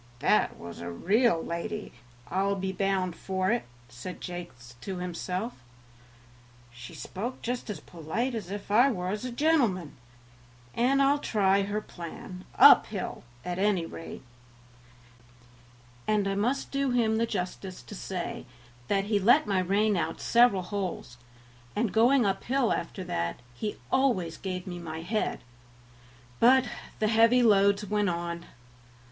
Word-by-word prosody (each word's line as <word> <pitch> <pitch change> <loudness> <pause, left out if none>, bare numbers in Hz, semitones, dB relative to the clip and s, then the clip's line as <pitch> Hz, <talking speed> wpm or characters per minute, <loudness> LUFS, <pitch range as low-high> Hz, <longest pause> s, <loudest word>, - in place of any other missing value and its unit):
"That - - +2
was 85 0 -9
a 85 - -5
real 195 - +2
lady, 210 +5 -4 0.4
I'll 195 +6 0
be 190 0 -2
bound 190 -2 0
for 190 +1 -1
it," 240 - 0 0.2
said 120 +9 -8
Jakes 150 -10 -8
to 190 +5 -5
himself; 180 +5 -4 1.2
"she 120 0 -10
spoke 235 +7 -6
just 245 0 -3
as 210 - -4
polite 175 +10 -3
as 210 -6 -5
if 200 0 -6
I 240 +6 +6
was 205 0 -3
a 255 - -4
gentleman, 240 - +1 0.8
and 270 +4 +3
I'll 285 +1 +3
try 200 -6 +2
her 205 +2 -2
plan, 180 0 -9
uphill, 220 -7 +5 0.2
at 180 0 -3
any 195 -4 +2
rate;" 165 -3 -9 1.8
and 210 -2 +2
I 195 - 0
must 240 +8 -1
do 275 -1 0
him 230 -3 +2
the 230 +1 +1
justice 185 -2 -4
to - - -11
say 185 -3 -5 0.4
that 195 -1 +1
he 205 0 +1
let 215 +5 +5
my 200 -3 +1
rein 200 +3 +2
out 165 -2 -2
several 235 -6 +4
holes, 180 - -4 0.6
and 215 -1 0
going 240 +2 +5
uphill 235 +6 +1
after 190 - -4
that, 85 - -2
he 205 - -4 0.2
always 215 -12 +2
gave 185 -2 -4
me 175 -1 -6
my 160 -1 -6
head; 215 +5 -1 1.0
but 260 +2 +6 0.3
the 215 - +1
heavy 230 +3 +5
loads 200 -1 +4
went 210 -1 +1
on. 170 0 -4
200 Hz, 140 wpm, -28 LUFS, 180-230 Hz, 1.8 s, I